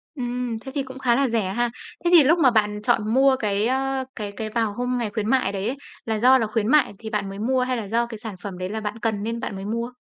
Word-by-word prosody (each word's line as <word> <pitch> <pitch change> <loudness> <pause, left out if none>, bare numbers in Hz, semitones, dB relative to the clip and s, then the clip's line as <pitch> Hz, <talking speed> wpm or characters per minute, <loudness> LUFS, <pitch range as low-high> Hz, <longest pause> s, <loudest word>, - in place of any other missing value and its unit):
Ừm, 245 -2 -3
thế 265 +3 -9
thì 280 - 0
cũng 260 0 -10
khá 240 -3 +3
là 275 -1 +2
rẻ 215 -5 -1
ha. 240 0 +1 0.4
Thế 345 - +3
thì 325 -4 +9
lúc 330 +5 +4
mà 260 -5 +5
bạn 210 -2 +1
chọn 225 -2 +1
mua 265 0 +5
cái, 210 -2 0
ơ, 265 0 0
cái 205 -2 -5
cái 215 +1 -5
vào 225 -2 -1
hôm 250 +1 -2
ngày 235 -3 -1
khuyến 215 0 -2
mại 255 -7 +2
đấy 200 +2 -3
ấy, 265 +3 -2 0.3
là 220 -1 -1
do 255 +3 +6
là 225 - 0
khuyến 215 0 -1
mại 295 -5 +4
thì 220 - -6
bạn 205 -3 -2
mới 195 +1 -7
mua 255 +3 +1
hay 255 -1 0
là 210 -3 -4
do 235 +3 +1
cái 230 -2 -8
sản 215 -2 -7
phẩm 195 -3 -6
đấy 185 0 -4
là 220 +2 -3
bạn 210 +2 -4
cần 215 -3 -1
nên 230 +1 -3
bạn 200 - -4
mới 195 +1 -6
mua? 230 +3 -3
230 Hz, 295 wpm, -23 LUFS, 210-255 Hz, 0.4 s, thì